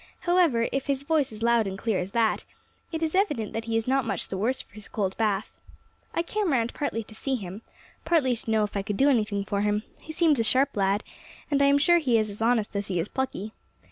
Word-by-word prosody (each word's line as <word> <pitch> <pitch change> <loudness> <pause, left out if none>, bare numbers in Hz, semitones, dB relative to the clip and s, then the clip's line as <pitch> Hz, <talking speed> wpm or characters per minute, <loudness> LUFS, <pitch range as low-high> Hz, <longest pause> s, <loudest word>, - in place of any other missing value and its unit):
"However, 340 -10 +3
if 275 +1 -2
his 280 -1 0
voice 300 -2 +2
is 215 - -10
as - - -2
loud 235 -2 +3
and 190 0 -4
clear 215 -2 0
as 180 - -3
that, 230 -2 +2 0.5
it 325 -1 -2
is 315 - -1
evident 295 - 0
that 225 0 -3
he 225 -1 0
is 225 - -2
not 265 +1 +2
much 230 - -3
the - - -3
worse 230 +7 0
for - - -11
his 210 -1 -7
cold 195 -3 -2
bath. 210 -2 -1 0.6
I 335 - +1
came 410 0 -1
round 235 -3 +1
partly 230 -6 -2
to 220 - -14
see 265 +5 -2
him, 200 -2 -6 0.4
partly 310 -7 +2
to 230 - -7
know 220 -1 +3
if 210 - -4
I 200 - +1
could 205 0 -3
do 275 +2 +5
anything 210 -5 +1
for 200 0 -1
him; 210 +1 +1 0.2
he 315 - -8
seems 315 -4 +3
a - - +3
sharp 265 +5 +2
lad, 200 +1 +1 0.5
and 280 -1 +3
I - - +6
am 280 0 +5
sure 345 +4 +5
he 255 -7 +2
is 215 -1 0
as 205 - -8
honest 225 -3 +1
as 200 0 -2
he 180 -3 -1
is 170 - -2
plucky. 255 -5 -3
230 Hz, 255 wpm, -26 LUFS, 210-280 Hz, 0.6 s, I